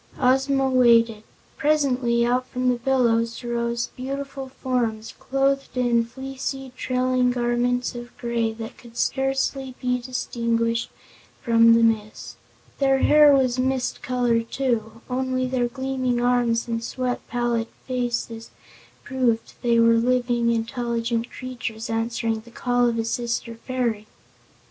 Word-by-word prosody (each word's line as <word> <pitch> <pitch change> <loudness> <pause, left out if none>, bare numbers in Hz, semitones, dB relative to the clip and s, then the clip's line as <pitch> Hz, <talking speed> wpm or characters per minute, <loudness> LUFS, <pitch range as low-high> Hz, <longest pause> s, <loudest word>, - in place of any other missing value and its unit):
Ozma 270 +1 +3
waited. 235 -4 +4 0.4
Presently 255 -6 +2
out 250 +1 +1
from 255 0 -1
the 250 - +1
billows 235 -2 +1
rose 235 0 -2
beautiful 270 +1 -5
forms, 235 -4 -2
clothed 275 0 0
in 240 -2 +2
fleecy, 270 +1 -6
trailing 255 0 +1
garments 245 0 0
of 240 0 -9
gray 235 -1 -1
that 225 0 -8
could 235 -1 -14
scarcely 270 0 -1
be 250 0 0
distinguished 230 -2 -1 0.5
from 230 -1 +5
the 230 - +4
mist. 215 -2 -1 0.4
Their 270 -1 +3
hair 295 +2 +6
was 260 -2 +2
mist 260 -1 -1
color, 245 -2 +1
too; 230 -2 -2
only 255 0 -1
their 255 -1 0
gleaming 255 0 -2
arms 240 -1 +1
and 230 -1 -2
sweet, 250 +1 -2
pallid 240 -1 -1 0.2
faces 240 -3 -3 0.5
proved 245 -4 0
they 235 -1 +3
were 230 0 +6
living, 240 0 +1
intelligent 235 0 -1
creatures 235 -3 -6
answering 225 0 -1
the 230 +2 -15
call 245 0 +1
of 230 - -2
a 225 - -1
sister 235 0 -2
fairy. 230 -3 -3
245 Hz, 125 wpm, -24 LUFS, 230-255 Hz, 0.5 s, hair